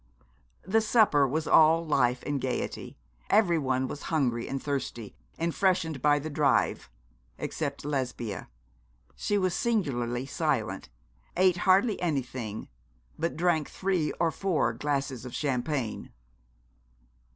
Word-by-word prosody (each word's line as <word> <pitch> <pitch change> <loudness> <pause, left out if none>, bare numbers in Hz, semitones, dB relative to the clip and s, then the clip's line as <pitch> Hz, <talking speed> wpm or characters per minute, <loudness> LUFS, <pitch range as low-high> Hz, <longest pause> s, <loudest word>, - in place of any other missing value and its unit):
The 220 +4 +2
supper 215 - +4
was 155 +4 -1
all 160 +1 +5
life 125 -4 +1
and 145 -2 -1
gaiety. 130 -1 -4 0.3
Everyone 145 -11 +2
was 145 - -7
hungry 125 -7 0
and 135 - -3
thirsty, 130 -7 -4 0.2
and 165 0 -1
freshened 180 -7 +1
by 145 +1 +4
the 145 +2 -4
drive, 145 - +1 0.5
except 140 -3 -4
Lesbia. 125 -7 -3 0.7
She 205 - 0
was 185 -2 +1
singularly 130 - -1
silent, 135 - -2 0.5
ate 185 -1 +4
hardly 200 +3 +4
anything, 130 -9 -3 0.5
but 165 -1 -2
drank 165 -3 +1
three 185 -5 0
or 165 -1 0
four 165 -12 0
glasses 135 -1 -2
of 125 - -7
champagne. 130 -3 -2
145 Hz, 120 wpm, -28 LUFS, 130-170 Hz, 0.7 s, all